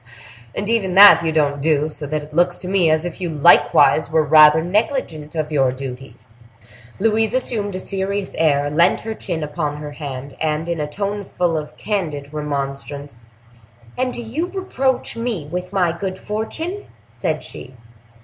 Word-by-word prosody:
And 205 - -3
even 205 -5 0
that 200 -3 +9
you 165 - 0
don't 145 -2 +1
do; 150 0 +2
so 150 -1 -5
that 155 +1 -3
it 150 +1 -13
looks 175 +2 +2
to 180 - -8
me 185 -3 +3
as 155 +1 +1
if 175 +1 -6
you 175 - -2
likewise 155 0 +4
were 160 -1 +2
rather 155 +1 +6
negligent 180 - -2
of 155 -1 -2
your 135 -4 +2
duties!" 130 -2 -9 0.7
Louise 220 +2 +1
assumed 215 -6 -2
a - - -3
serious 195 +1 -3
air, 145 -3 +2
leant 170 +4 +3
her 220 0 -4
chin 170 -7 -4
upon 150 0 -3
her 150 0 -7
hand, 140 -2 -7
and, 155 +1 -1
in 170 -1 -2
a 150 - -2
tone 200 +5 -3
full 175 -3 -1
of 150 -1 -5
candid 155 -9 -3
remonstrance, 140 -3 -5 0.7
"And 255 0 -1
do 240 - -5
you 280 +10 -3
reproach 275 -12 -2
me 230 -9 -3
with 180 +1 -4
my 180 -4 +1
good 190 +1 -4
fortune?" 320 - -5 0.2
said - - -3
she. 130 - -9
165 Hz, 170 wpm, -20 LUFS, 150-205 Hz, 0.7 s, that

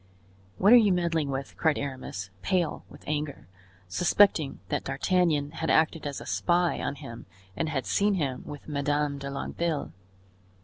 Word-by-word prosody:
"What 205 +5 +6
are - - +11
you 215 -4 +5
meddling 170 -4 +1
with?" 135 0 -4
cried 160 -2 +2
Aramis, 130 -8 -5
pale 175 - 0
with - - -14
anger, 145 - -3 0.4
suspecting 160 - +3
that - - -1
D'Artagnan 150 0 +1
had 160 +1 -3
acted 160 -1 +2
as 140 - -4
a - - -9
spy 175 0 +1
on 140 - -2
him 115 -6 -10 0.3
and 160 - -1
had 135 -6 -2
seen 200 - +2
him 135 -7 -2
with 145 - -9
Madame 145 -1 0
de 140 0 -5
Longueville. 145 - -3
150 Hz, 160 wpm, -28 LUFS, 140-170 Hz, 0.4 s, are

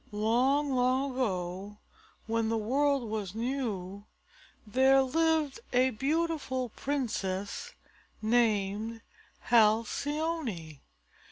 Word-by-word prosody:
Long, 250 +7 +2
long 260 +2 +2
ago 195 -4 -3 0.5
when 225 0 0
the 225 - +1
world 270 +3 +1
was 210 -3 -4
new, 215 -6 -3 0.6
there 265 +4 +4
lived 315 0 +1
a 255 +1 +4
beautiful 275 -1 -1
princess 210 -8 -3 0.4
named 220 -1 +1 0.5
Halcyone. 230 - +1
240 Hz, 80 wpm, -30 LUFS, 210-275 Hz, 0.6 s, there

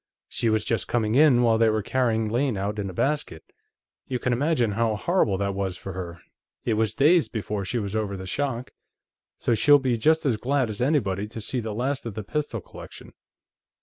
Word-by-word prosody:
She 115 - -1
was 110 -1 +1
just 115 - -1
coming 110 -3 0
in 135 -3 +5
while 115 -1 +3
they 115 -1 +5
were 110 -1 0
carrying 115 -3 0
Lane 120 +1 0
out 100 +2 -3
in 100 -1 -3
a - - -5
basket. 140 - -1 0.6
You 130 - -1
can 125 0 -1
imagine 125 -3 +1
how 110 +1 0
horrible 110 - +1
that 100 0 -1
was 95 -2 -3
for 95 - -7
her; 85 -3 -7 0.4
it 115 - +1
was 110 -1 0
days 155 +4 +4
before 105 -3 -3
she 95 - -2
was 105 -2 -3
over 105 -3 -2
the 95 - -7
shock. 130 +3 -3 0.7
So 120 - 0
she'll 145 +6 +6
be 130 -4 0
just 155 +7 +2
as 125 -6 +2
glad 130 0 0
as 105 - -6
anybody 105 -8 +1
to 115 - -8
see 120 +4 -2
the 110 -2 -4
last 130 +2 -2
of 110 - -6
the 110 - -4
pistol 145 -2 -3
collection." - - -12
115 Hz, 210 wpm, -25 LUFS, 105-130 Hz, 0.7 s, she'll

